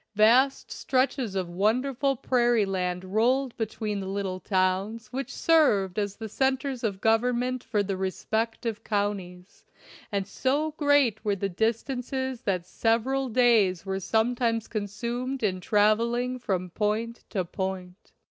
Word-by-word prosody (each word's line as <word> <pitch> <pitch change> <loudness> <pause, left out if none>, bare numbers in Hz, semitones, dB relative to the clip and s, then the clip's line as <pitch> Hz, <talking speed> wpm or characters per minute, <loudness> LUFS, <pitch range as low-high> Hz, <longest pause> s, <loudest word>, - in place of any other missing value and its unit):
Vast 245 +6 +4
stretches 255 -5 0
of 185 -2 -1
wonderful 250 +9 +1
prairie 240 -3 +2
land 180 -2 -2
rolled 240 +6 +1
between 215 -2 -3
the 190 - -5
little 190 -1 -3
towns 195 +4 -1
which 270 +1 -3
served 215 - +3
as 200 -1 -2
the 225 - -6
centers 265 +2 -1
of 200 -4 -1
government 245 +3 +1
for 210 -3 0
the 195 -1 -2
respective 220 +4 -2
counties, 200 -3 -3 0.5
and 200 -2 -1
so 280 +9 0
great 285 -8 +2
were 205 -2 +1
the 200 0 -2
distances 250 +5 -2
that 185 -6 -1
sev 225 +4 +1
eral 265 0 -1
days 215 -7 +3
were 190 0 -2
sometimes 230 +2 0
consumed 235 +5 -3
in 185 -3 0
traveling 235 +5 +2
from 185 -5 -2
point 220 +4 -2
to 190 -5 -1
point. 190 +1 -5
220 Hz, 135 wpm, -27 LUFS, 195-250 Hz, 0.5 s, Vast